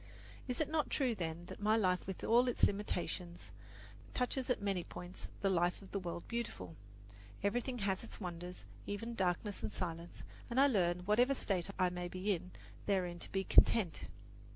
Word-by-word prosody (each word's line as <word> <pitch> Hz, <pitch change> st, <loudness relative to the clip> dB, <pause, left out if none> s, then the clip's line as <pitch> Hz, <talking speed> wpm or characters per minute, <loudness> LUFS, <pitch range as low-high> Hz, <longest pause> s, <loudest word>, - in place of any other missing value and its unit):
Is 250 Hz, -, -2 dB
it 310 Hz, -, +2 dB
not 310 Hz, -1 st, 0 dB
true, 260 Hz, -4 st, +2 dB
then, 170 Hz, -3 st, -3 dB
that -, -, -9 dB
my 215 Hz, +2 st, +4 dB
life 185 Hz, -4 st, +2 dB
with 190 Hz, -, -5 dB
all 240 Hz, +3 st, +5 dB
its 245 Hz, -, -1 dB
limitations 180 Hz, -3 st, 0 dB, 0.6 s
touches 250 Hz, +1 st, 0 dB
at 250 Hz, -, +2 dB
many 195 Hz, -3 st, 0 dB
points 180 Hz, +2 st, -8 dB
the 195 Hz, -, +3 dB
life 175 Hz, 0 st, +2 dB
of 190 Hz, -, -13 dB
the 200 Hz, -, -1 dB
World 175 Hz, -2 st, -5 dB
Beautiful? 210 Hz, -, -4 dB, 0.7 s
Everything 245 Hz, +5 st, 0 dB
has 195 Hz, -2 st, 0 dB
its 230 Hz, -, -9 dB
wonders, 180 Hz, -1 st, -6 dB, 0.2 s
even 230 Hz, +4 st, -3 dB
darkness 190 Hz, 0 st, 0 dB
and 110 Hz, -, -2 dB
silence, 170 Hz, -, -5 dB, 0.3 s
and 240 Hz, +2 st, +1 dB
I 275 Hz, -, +8 dB
learn, 180 Hz, -9 st, +3 dB
whatever 240 Hz, +8 st, +4 dB
state 190 Hz, -7 st, 0 dB
I 185 Hz, -2 st, +3 dB
may 180 Hz, 0 st, -3 dB
be 185 Hz, +3 st, 0 dB
in, 180 Hz, 0 st, -5 dB, 0.4 s
therein 180 Hz, -4 st, +1 dB
to -, -, -8 dB
be 195 Hz, 0 st, 0 dB
content. 190 Hz, -5 st, +5 dB
195 Hz, 175 wpm, -36 LUFS, 175-230 Hz, 0.7 s, I